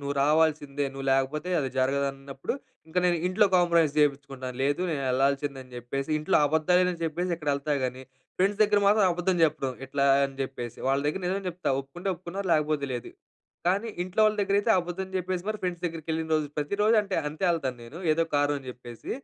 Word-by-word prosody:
నువ్వు 140 0 -3
రావాల్సిందే 150 -1 +2
నువ్వు 135 0 -6
లేకపోతే 135 +5 0
అది 135 -3 -1
జరగదు 140 +2 +2
అన్నప్పుడు, 135 - -5 0.3
ఇంక 160 - -12
నేను 175 -1 +3
ఇంట్లో 185 +3 +4
కాంప్రమైస్ 170 -4 +3
చేపించుకుంటాను. 135 -3 -1
లేదు 145 +4 +1
నేను 145 -4 -2
వెళ్ళాల్సింది 140 +2 +1
అని 130 - -19
జెప్పేసి 135 +4 -4
ఇంట్లో 155 - +2
అబద్దాలే 160 +4 +3
అని 170 -1 -8
చెప్పేసి 170 +3 -2
ఇక్కడ 150 -2 -5
వెళ్తా. 140 +2 -2
కానీ 130 +1 -4 0.4
ఫ్రెండ్స్ 200 +3 +1
దగ్గర 210 -1 +4
మాత్రం 205 0 +5
అబద్ధం 180 +1 0
చెప్పడం. 140 -4 -1
ఇట్లా 140 +1 0 0.2
అని 135 0 -4
చెప్పేసి 120 -3 -6
వాళ్ళ 135 +1 +2
దగ్గర 155 +6 -1
నిజం 195 +2 -1
చెప్తా. 180 +1 -4
ఒప్పుకుంటే 140 +8 -7
ఒప్పుకున్నారు. 185 +3 -6
లేకపోతే 150 -2 0
లేదు. 120 - -6 0.6
కానీ 200 +6 +1
ఇంట్లో 185 +4 -2
వాళ్ళ 215 0 +3
దగ్గరైతే 200 +2 +2
అబద్ధం 180 +2 -4
చెప్పేసి 180 0 -3
మరి 215 0 -2
ఫ్రెండ్స్ 180 -1 -3
దగ్గరికి 165 -2 -4
వెళ్ళిన 160 0 -2
రోజు 150 -1 -2
ప్రతిరోజు 205 +9 +2
అంటే 195 -2 -3
అంతే 155 +5 -4
వెళ్తాను. 135 -7 -1
నేను 140 +8 -10
ఏదో 165 +2 +2
కారణం 145 0 +2
అని 130 - -11
చెప్పేసి 120 -2 -10
155 Hz, 185 wpm, -27 LUFS, 140-180 Hz, 0.6 s, మాత్రం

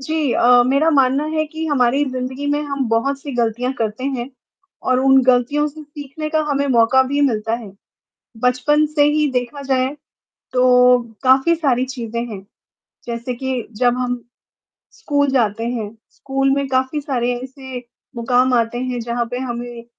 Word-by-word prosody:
जी 305 -1 -1
अ, 245 0 +5
मेरा 280 +5 +3
मानना 275 -1 +3
है 310 0 0
कि 315 +1 -6
हमारी 275 -1 +2
ज़िंदगी 255 +2 -4
में 290 0 +1
हम 280 -2 -2
बहुत 230 +5 0
सी 280 0 -7
गलतियाँ 240 +2 0
करते 220 +3 -3
हैं 265 -2 -3 0.5
और 255 0 +1
उन 270 0 +5
गलतियों 255 +4 +2
से 305 +1 -11
सीखने 295 +1 -7
का 315 - +1
हमें 280 0 0
मौका 245 +1 +4
भी 280 +2 -1
मिलता 225 -4 0
है। 230 -4 -7 0.7
बचपन 255 +5 +2
से 300 -1 +2
ही 300 0 +2
देखा 250 +3 -3
जाए, 260 -1 +1 0.7
तो 250 0 +5 0.2
काफ़ी 265 +6 +4
सारी 265 -6 +1
चीज़ें 235 -3 -5
हैं। 195 -4 -8 0.6
जैसे 235 +1 -4
कि, 260 -1 -3
जब 245 +3 +1
हम 245 -1 -2 0.7
स्कूल 290 -11 0
जाते 225 -4 0
हैं, 225 -4 -3 0.2
स्कूल 270 0 -1
में 280 0 -1
काफ़ी 260 +3 0
सारे 250 -4 -1
ऐसे 265 -1 -8 0.4
मुकाम 250 +2 +2
आते 235 0 0
हैं, 250 -1 -3
जहाँ 235 +1 -2
पे 245 - -3
हमें 240 -2 -6
255 Hz, 160 wpm, -19 LUFS, 240-280 Hz, 0.7 s, अ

